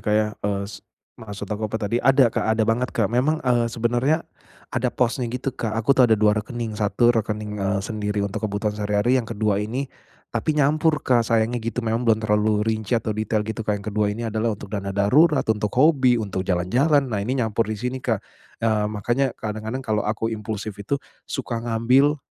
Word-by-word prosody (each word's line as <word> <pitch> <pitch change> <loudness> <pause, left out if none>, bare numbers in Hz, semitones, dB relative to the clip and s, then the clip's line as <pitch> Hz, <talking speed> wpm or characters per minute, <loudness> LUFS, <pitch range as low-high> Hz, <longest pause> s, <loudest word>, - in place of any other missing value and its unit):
Kak 105 - 0
ya, 105 0 +3
eee, 100 -1 -1
s 100 - -9 0.4
maksud 105 -2 -7
aku 110 +1 -2
apa 110 - -2
tadi, 110 +2 -1
ada 135 -2 +4
Kak, - - -1
ada 110 - +2
banget 115 +3 +1
Kak. 110 -1 +1
Memang, 150 +6 +1
eee, 120 -2 +2
sebenarnya, 120 +7 0 0.5
ada 125 0 +1
posnya 120 0 0
gitu 125 +2 -3
Kak, 115 -3 -3
aku 115 +5 +3
tuh 125 -3 +5
ada 110 - +5
2 105 0 +4
rekening, 115 0 -5
1 120 +3 +3
rekening, 105 -2 -2
eee, 95 0 0
sendiri 105 -2 -2
untuk 100 +1 -4
kebutuhan 105 +1 -1
sehari-hari, 105 +5 +1
yang 115 - -9
kedua 105 -2 0
ini, 120 +7 -2 0.5
tapi 155 -1 -1
nyampur 150 +2 +2
Kak, 125 -2 +4
sayangnya 115 +1 +1
gitu. 115 +1 -3
Memang 115 +1 0
belum 110 0 +3
terlalu 105 0 +2
rinci 110 0 0
atau 110 -1 -1
detail 110 0 -1
gitu 110 +1 -5
Kak, 105 -1 0
yang 100 - -10
kedua 105 -1 0
ini 115 +3 -3
adalah 110 -1 0
untuk 100 +1 -11
dana 100 -1 -3
darurat, 145 +10 +4
untuk 105 -1 0
hobi, 130 -4 +5
untuk 100 -4 -3
jalan-jalan. 120 - +2
Nah 110 -6 -2
ini 125 +6 -1
nyampur 115 -2 0
di 110 - -2
sini 125 +4 -3
Kak, 115 -4 -1 0.4
eee, 105 -2 +2
makanya 120 +5 -1
kadang-kadang 110 +4 -5
kalau 110 -1 0
aku 115 +1 -1
impulsif 110 -1 -4
itu, 140 +8 -1 0.3
suka 120 -4 -3
ngambil 125 +6 +3
110 Hz, 200 wpm, -23 LUFS, 105-125 Hz, 0.5 s, tuh